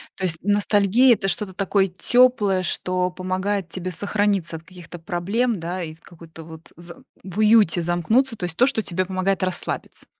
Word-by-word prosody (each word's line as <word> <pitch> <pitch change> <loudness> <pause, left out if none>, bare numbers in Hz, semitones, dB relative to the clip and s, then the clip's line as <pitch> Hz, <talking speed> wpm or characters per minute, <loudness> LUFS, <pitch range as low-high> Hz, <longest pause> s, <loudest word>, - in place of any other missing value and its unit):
То 190 - -8
есть 165 -3 -1
ностальгия- 205 +4 +3
это 195 - -4
что-то 195 0 -3
такое 195 0 +1
тёплое, 210 0 +2
что 180 +1 -1
помогает 185 +1 -3
тебе 185 +1 -5
сохраниться 200 -2 -1
от 160 - -15
каких-то 175 -1 -12
проблем, 195 +7 -1
да, 175 +3 -4
и 155 -1 -7
в 160 - -28
какой-то 165 -1 -14
вот 160 0 -13
з 170 0 -11 0.3
в 185 0 -9
уюте 215 -5 +4
замкнуться, 215 +10 +1
то - - -9
есть 170 -2 -6
то, 255 - +4
что 265 -5 0
тебе 185 -2 -2
помогает 185 0 -1
расслабиться? 185 -1 -3
185 Hz, 175 wpm, -22 LUFS, 175-205 Hz, 0.3 s, уюте